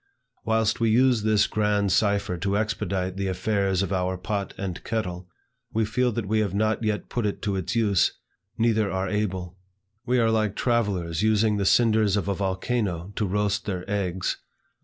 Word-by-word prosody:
Whilst 110 Hz, -1 st, +1 dB
we 115 Hz, -1 st, +2 dB
use 125 Hz, 0 st, +4 dB
this 105 Hz, -1 st, +3 dB
grand 105 Hz, -2 st, +1 dB
cipher 100 Hz, -1 st, +1 dB
to 100 Hz, +3 st, -1 dB
expedite 100 Hz, -4 st, -2 dB
the 100 Hz, 0 st, -1 dB
affairs 95 Hz, 0 st, 0 dB
of 100 Hz, 0 st, -2 dB
our 95 Hz, 0 st, -1 dB
pot 100 Hz, +2 st, -3 dB
and 95 Hz, -3 st, -5 dB
kettle, 90 Hz, -5 st, -3 dB, 0.4 s
we 110 Hz, 0 st, +1 dB
feel 125 Hz, +3 st, +1 dB
that 115 Hz, -1 st, -2 dB
we 110 Hz, +2 st, +1 dB
have 100 Hz, -3 st, -1 dB
not 110 Hz, +2 st, +1 dB
yet 105 Hz, -1 st, -1 dB
put 120 Hz, -3 st, -1 dB
it 100 Hz, -, -3 dB
to 100 Hz, -2 st, 0 dB
its 95 Hz, +3 st, -3 dB
use, 105 Hz, -5 st, +3 dB, 0.5 s
neither 110 Hz, -3 st, +2 dB
are 95 Hz, +1 st, -1 dB
able. 95 Hz, -3 st, -3 dB, 0.4 s
We 125 Hz, +1 st, +1 dB
are 115 Hz, -2 st, +3 dB
like 110 Hz, -2 st, +1 dB
travellers 100 Hz, -9 st, 0 dB
using 110 Hz, 0 st, +3 dB
the 100 Hz, -, 0 dB
cinders 110 Hz, -3 st, +4 dB
of 100 Hz, -, -2 dB
a 100 Hz, -, +1 dB
volcano 95 Hz, -1 st, -2 dB
to 105 Hz, -, 0 dB
roast 100 Hz, +1 st, 0 dB
their 90 Hz, -3 st, -3 dB
eggs. 95 Hz, -3 st, -1 dB
105 Hz, 180 wpm, -25 LUFS, 95-110 Hz, 0.5 s, use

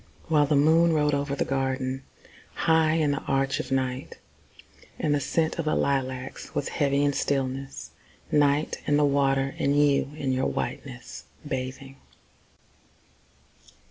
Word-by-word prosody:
While 150 Hz, -2 st, +4 dB
the 150 Hz, -, +2 dB
moon 160 Hz, +3 st, +4 dB
rode 150 Hz, -1 st, +2 dB
over 140 Hz, 0 st, -1 dB
the -, -, -1 dB
garden, 130 Hz, -1 st, -1 dB, 0.5 s
High 160 Hz, -1 st, +3 dB
in 155 Hz, -3 st, +2 dB
the 140 Hz, -, -1 dB
arch 135 Hz, 0 st, 0 dB
of -, -, -5 dB
night, 130 Hz, 0 st, -2 dB, 0.8 s
And 150 Hz, -, 0 dB
the 145 Hz, -, +2 dB
scent 160 Hz, +4 st, -1 dB
of 165 Hz, -, -1 dB
the 155 Hz, -, +1 dB
lilacs 130 Hz, -1 st, -2 dB
was 145 Hz, -, -1 dB
heavy 140 Hz, -1 st, +1 dB
with 145 Hz, -, +2 dB
stillness. 135 Hz, -1 st, -2 dB, 0.4 s
Night, 145 Hz, 0 st, +2 dB
and 145 Hz, -, +3 dB
the 150 Hz, -, +4 dB
water, 135 Hz, -1 st, +1 dB
and 140 Hz, +1 st, +2 dB
you 145 Hz, -1 st, +3 dB
in 140 Hz, -3 st, -2 dB
your 130 Hz, 0 st, +1 dB
whiteness, 125 Hz, -3 st, -5 dB, 0.2 s
bathing! 135 Hz, 0 st, -5 dB
140 Hz, 140 wpm, -26 LUFS, 135-145 Hz, 0.8 s, While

